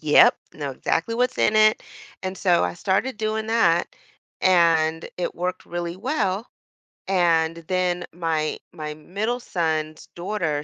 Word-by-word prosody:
Yep, 150 -1 +6 0.2
know 145 -2 -4
exactly 165 - -1
what's 250 +2 0
in 215 - +3
it, 215 0 +5 0.4
and 185 0 -4
so 180 -3 +3
I 90 0 -2
started 215 - 0
doing 220 0 -2
that, 175 -7 +3 0.5
and 165 -3 +3
it 180 - -3
worked 180 +1 -3
really 175 0 -4
well. 215 -3 -1 0.6
And 165 -3 +2
then 180 -1 0
my 160 -2 -1
my 150 -1 -5
middle 205 +10 -3
son's 155 -7 -2
daughter, 170 -5 -2
175 Hz, 135 wpm, -24 LUFS, 160-210 Hz, 0.6 s, Yep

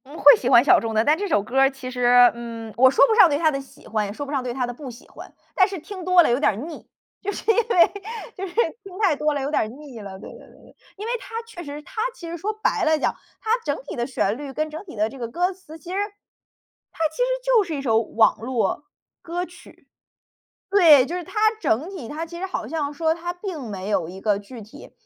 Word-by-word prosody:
嗯， 290 +4 -11
会 285 - +9
喜 250 - -2
欢 240 -2 +7
小 - - +6
众 225 -1 -4
的， 220 - +4
但 300 - +4
这 405 +3 -2
首 205 - +2
歌 255 +5 -1
儿 270 0 +6
其 270 -2 -8
实， 245 0 +5
嗯， 230 -2 -8
我 260 +2 +6
说 270 - +5
不 450 - +2
上 435 -6 +7
对 285 - +1
它 315 0 +3
的 275 -1 -3
喜 270 - -18
欢 215 -1 -1
也 - - -5
说 285 +7 -6
不 280 - -8
上 275 -3 0
对 250 - -3
它 255 0 -1
的 245 - -5
不 265 +2 -9
喜 240 +1 -13
欢， - - -12 0.2
但 375 - +4
是 390 -2 -6
听 375 +3 -8
多 365 0 +6
了 - - +2
有 245 - +2
点 235 0 0
腻， 330 - -10 0.3
就 405 - -2
是 450 - 0
因 - - +1
为 445 -7 +4 0.4
就 385 +1 -5
是 355 - -11 0.3
听 380 -2 -11
太 390 -8 +3
多 300 0 0
了 280 - -2
有 275 +2 -3
点 215 - +1
腻 280 -6 -10
了。 195 -2 -8
对 - - -10
对 - - -13
对 - - -16
对， - - -20 0.2
因 415 - -6
为 470 - -2
它 455 +1 -6
确 455 -7 -10
实 295 0 -8
它 445 +6 -5
其 340 - -9
实 335 - -5
说 390 +6 -2
白 - - +1
了 315 0 +3
讲， 295 - 0 0.3
它 440 - -3
整 290 -1 -1
体 280 - -7
的 240 -1 -2
旋 215 -6 0
律 285 -2 -6
跟 310 +2 -2
整 315 +5 -7
体 350 - -11
的 210 0 +1
这 265 +4 -11
个 235 - -3
歌 355 +10 -1
词， 340 -4 -13
其 340 +3 -10
实 375 - -2 0.9
它 325 - 0
其 315 - -15
实 - - +2 0.2
就 - - +4
是 335 -4 -5
一 280 - -4
首 225 -5 +2
网 220 0 +2
络 230 +1 -1 0.4
歌 350 +1 -3
曲。 360 0 -17 0.8
对， 320 -10 +7
就 335 - -5
是 360 - -5
它 - - -14 0.3
整 280 - 0
体 350 - -7
它 315 +3 -4
其 340 +1 -9
实 380 - -2
好 225 -12 -4
像 290 0 -2
说 320 +1 +1
它 345 +1 -5
并 355 - -6
没 195 -1 -5
有 180 -6 0
一 190 +2 -10
个 205 -1 +1
具 225 +3 -11
体， 210 +1 -13
290 Hz, 285 characters per minute, -23 LUFS, 240-350 Hz, 0.9 s, 会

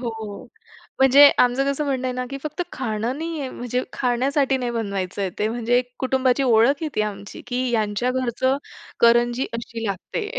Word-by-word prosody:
हो. 220 -4 -6 0.5
म्हणजे 270 +2 +8
आमचं 250 +2 +3
कसं 280 +2 -2
म्हणणं 260 -2 -1
आहे 255 - -1
ना, 255 0 -2
की 275 - -5
फक्त 305 +4 -3
खाणं 235 +2 -3
नाही 330 -1 -4
आहे, 270 - -3
म्हणजे 245 0 -3
खाण्यासाठी 265 +2 +1
नाही 245 -2 -2
बनवायचं 200 -4 -3
आहे. 190 - -1
ते 215 - +1
म्हणजे 240 +1 +1 0.2
कुटुंबाची 260 0 +1
ओळख 250 +4 +3
आहे 315 - -1
ती - - 0
आमची, 200 -1 -6
की 250 +1 -1
यांच्या 220 +1 0
घरचं 260 +1 0 0.4
करंजी 240 +2 +4
अशी 230 0 -5
लागते. 415 - -4
245 Hz, 175 wpm, -22 LUFS, 225-265 Hz, 0.5 s, म्हणजे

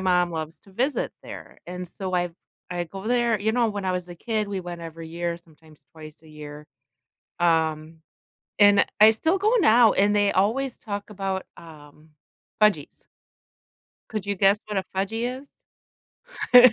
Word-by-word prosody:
mom 180 -2 +2
loves 160 -1 -5
to 195 - -19
visit 260 +8 -1
there, - - -10
and 180 +1 -6
so 185 +1 -5
I 175 -1 0 0.4
I 175 -1 -2
go 195 +4 -9
there 240 -2 +2
you 220 +2 0
know, 235 -1 +2
when 205 -2 -4
I 185 - 0
was 180 -1 -3
a 175 - -8
kid, 215 +3 -2
we 195 -2 -3
went 175 -1 -7
every 165 0 -8
year, 170 0 -3
sometimes 160 -2 -21
twice 155 -1 -12
a 160 - -17
year, 150 -1 -10 0.7
um, 160 -1 +1 0.6
and 205 -1 +6 0.2
I 215 +1 +9
still 320 - +1
go 425 +5 +2
now, 235 - +6
and 205 +1 +3
they 205 -1 +3
always 240 +7 +1
talk 205 -1 -6
about, 195 -2 -3
um, 155 -1 -15 0.5
"fudgies". 210 -9 +1 1.0
Could 215 -2 -3
you 200 -1 -1
guess 195 +2 +4
what 210 -1 -4
a 190 - -2
"fudgy" 230 +7 -2 1.1
is? 250 -1 +10
190 Hz, 165 wpm, -25 LUFS, 165-215 Hz, 1.1 s, is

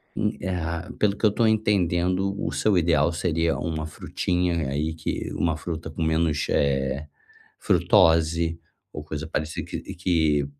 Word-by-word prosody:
hum, - - +1
eh, 95 - -3
a 85 0 -4
pelo 100 -1 +2
que - - 0
eu 105 - +5
tô 115 +2 +1
entendendo, 95 -3 +1
o - - -1
seu 105 -3 +2
ideal 85 -2 +3
seria 85 -1 0
uma 80 -2 -3
frutinha 85 -1 -1
aí 75 +3 -1
que 80 - -4
uma 80 -3 0
fruta 80 -1 -5
com 80 +2 -7
menos, 80 -2 +1
eh, 70 +1 0 0.5
frutose 80 0 +3 0.3
ou 75 - -7
coisa 75 +1 -5
parecida 80 0 -3
que - - -5
que 80 -5 +1
80 Hz, 155 wpm, -25 LUFS, 80-90 Hz, 0.5 s, eu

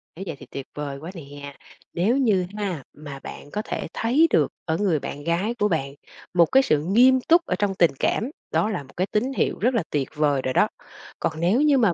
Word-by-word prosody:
Nếu 185 - -6
vậy 165 - -4
thì - - -11
tuyệt 135 -1 -6
vời 145 -2 -4
quá 165 +5 -7
nè! 145 -4 -9 0.4
Nếu 210 +9 +2
như 210 -9 +2
ha 185 -9 -3
mà 145 -2 -9
bạn 145 - -9
có 210 - -2
thể - - -4
thấy 265 +9 +3
được - - +3 0.2
ở 160 -1 0
người 185 -6 +1
bạn 145 +1 -6
gái 170 +8 0
của 210 - +3
bạn 140 -7 -1 0.4
một 175 -1 +6
cái 265 +11 +4
sự 155 - +2
nghiêm 245 +9 +5
túc 335 +5 +4
ở - - -1
trong 200 -2 0
tình 170 -4 +4
cảm, 230 - 0 0.2
đó 210 - +2
là 180 -9 -3
một 135 - -18
cái 185 +2 +1
tín 245 +7 -1
hiệu - - 0
rất 250 +5 +2
là 230 -6 +1
tuyệt 140 -3 -1
vời 145 -2 +2
rồi 130 0 -2
đó. - - +4 0.5
Còn 155 0 -2
nếu 185 - +3
như 295 -2 +4
mà 220 -8 +3
180 Hz, 235 wpm, -24 LUFS, 150-225 Hz, 0.5 s, một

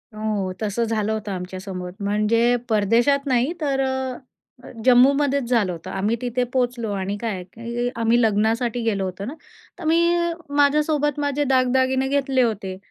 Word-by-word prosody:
हो, 215 -3 -2
तसं 215 +2 -1
झालं 220 -1 -1
होतं 215 -1 -3
आमच्यासोबत 185 +1 -6
म्हणजे 215 +4 +2
परदेशात 230 +7 +2
नाही 255 +2 +2
तर 275 -3 0
अ, 265 -1 -1 0.5
अ, - - -11
जम्मूमध्येच 270 +1 +4
झालं 225 -7 +2
होतं. 170 +1 -8
आम्ही 205 +4 0
तिथे 250 0 -1
पोहोचलो 245 -4 -1
आणि 195 0 -2
काय 230 -1 -1
आहे 185 -1 -6
की 235 +1 -3
आम्ही 230 +1 +2
लग्नासाठी 225 +2 +1
गेलो 205 -4 0
होतो 185 +2 -5
ना, 255 - -5 0.5
तर - - -8
मी 325 +2 +3 0.6
माझ्यासोबत 295 0 +2
माझे 290 0 0
दागदागिने 260 0 +2
घेतले 270 -1 +1
होते. 200 -5 -1
235 Hz, 155 wpm, -22 LUFS, 210-265 Hz, 0.6 s, जम्मूमध्येच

